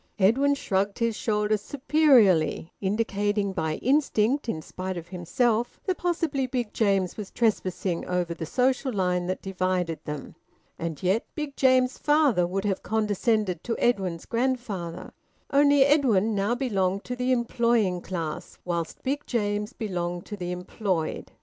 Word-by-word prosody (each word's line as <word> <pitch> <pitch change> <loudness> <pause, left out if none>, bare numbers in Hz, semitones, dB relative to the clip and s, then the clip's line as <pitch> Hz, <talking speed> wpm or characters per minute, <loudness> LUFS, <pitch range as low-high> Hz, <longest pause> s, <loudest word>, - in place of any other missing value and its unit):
Edwin 260 +9 +4
shrugged 200 -6 -1
his 230 -1 0
shoulders 210 -1 0
superiorly, 250 - +3
indicating 205 0 0
by 160 -3 -1
instinct, 265 -2 +2
in 155 -7 -3
spite 185 +2 -5
of 170 0 -8
himself, 220 +7 0
that 370 -2 -1
possibly 325 -6 0
Big 245 -4 -3
James 195 -4 +1
was 210 -3 -6
trespassing 190 -5 0
over 180 -1 -1
the 165 -1 -6
social 260 - +1
line 180 -4 0
that 185 - -3
divided 185 -3 -1
them. 150 -1 -6 0.5
And 165 -1 -4
yet 190 +5 +2
Big 300 -3 -4
James's 255 -1 +3
father 290 - +3
would 195 +3 -2
have 195 -2 0
condescended 210 -4 0
to 230 - -2
Edwin's 190 -8 0
grandfather. 230 -9 -2 0.4
Only, 285 -1 +5
Edwin 235 -8 +3
now 205 +4 +1
belonged 200 -6 0
to 250 - -4
the 250 +1 0
employing 235 -6 +1
class, 165 -5 -5
whilst 170 -2 -3
Big 280 +2 -2
James 210 -3 -1
belonged 175 -4 -4
to 210 - -6
the 180 -3 -4
employed. 180 -2 -3
210 Hz, 145 wpm, -26 LUFS, 180-250 Hz, 0.5 s, Only